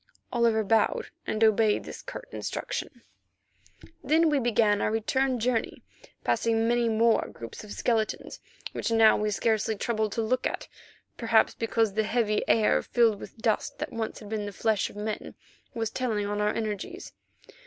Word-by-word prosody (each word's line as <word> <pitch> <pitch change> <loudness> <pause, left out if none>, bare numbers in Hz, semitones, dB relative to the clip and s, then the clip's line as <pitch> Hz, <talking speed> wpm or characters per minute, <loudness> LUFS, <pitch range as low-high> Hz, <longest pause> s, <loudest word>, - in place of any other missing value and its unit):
Oliver 230 -2 +3
bowed 215 +1 +1 0.2
and 215 +1 0
obeyed 220 -1 +4
this - - -8
curt - - -8
instruction. - - -5 1.0
Then 320 +1 +3
we 290 - +3
began 220 -4 +2
our - - +1
return 255 +4 0
journey, 230 0 -1 0.4
passing 225 0 +1
many 240 0 +2
more 225 +1 +3
groups 115 - -9
of 210 - -11
skeletons 225 -3 -1 0.3
which - - -3
now 225 -1 +6
we 210 0 0
scarcely 220 +1 0
troubled 215 0 -1
to 230 - -1
look 250 +3 +1
at, - - -5 0.5
perhaps 230 -2 +3
because 225 -2 0
the 220 - +2
heavy 215 -1 +1
air 220 -2 +4
filled 230 -4 +2
with - - -10
dust 220 -1 -1
that - - -5
once 225 -1 -3
had 210 - -10
been 210 -1 -3
the - - -5
flesh 215 0 0
of - - -14
men, 210 +1 -5 0.4
was 225 -2 -2
telling 220 -5 -1
on 205 0 -2
our 210 0 +2
energies. 215 -3 -5
220 Hz, 165 wpm, -27 LUFS, 215-230 Hz, 1.0 s, now